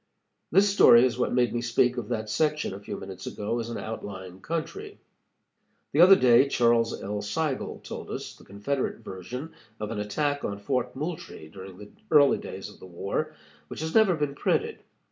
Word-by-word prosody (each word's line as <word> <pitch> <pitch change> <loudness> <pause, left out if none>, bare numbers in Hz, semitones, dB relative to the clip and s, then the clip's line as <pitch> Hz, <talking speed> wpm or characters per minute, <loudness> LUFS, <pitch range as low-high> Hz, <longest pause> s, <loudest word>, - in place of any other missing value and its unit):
This 195 +4 +5
story 130 -11 +7
is 125 -1 -1
what - - +1
made 120 -2 +2
me 120 - -1
speak 120 +1 +2
of 120 -4 -4
that 110 -2 -3
section 150 +3 0
a 95 - -7
few 100 - -6
minutes 95 -1 -8
ago 105 +3 -3
as 115 0 -4
an 115 - -4
outlying 95 -4 -7
country. 395 - -5 0.9
The 155 - +4
other 190 +2 +9
day 130 -1 +5
Charles 115 -3 +2
L. 105 +1 -3
Seigel 135 +7 -3
told - - -7
us - - -6
the - - -18
Confederate 125 +8 -3
version 125 - -7 0.3
of 105 0 -4
an 110 - -3
attack 145 +8 -1
on 100 - -3
Fort 125 +4 -2
Moultrie 150 - -6
during 95 +2 -11
the 105 +1 -12 0.2
early 145 -2 +5
days - - -7
of - - -14
the - - -11
war, 100 - -3 0.3
which - - -7
has 160 0 -3
never 215 -5 +5
been 150 -2 -2
printed. - - -1
120 Hz, 185 wpm, -27 LUFS, 105-150 Hz, 0.9 s, other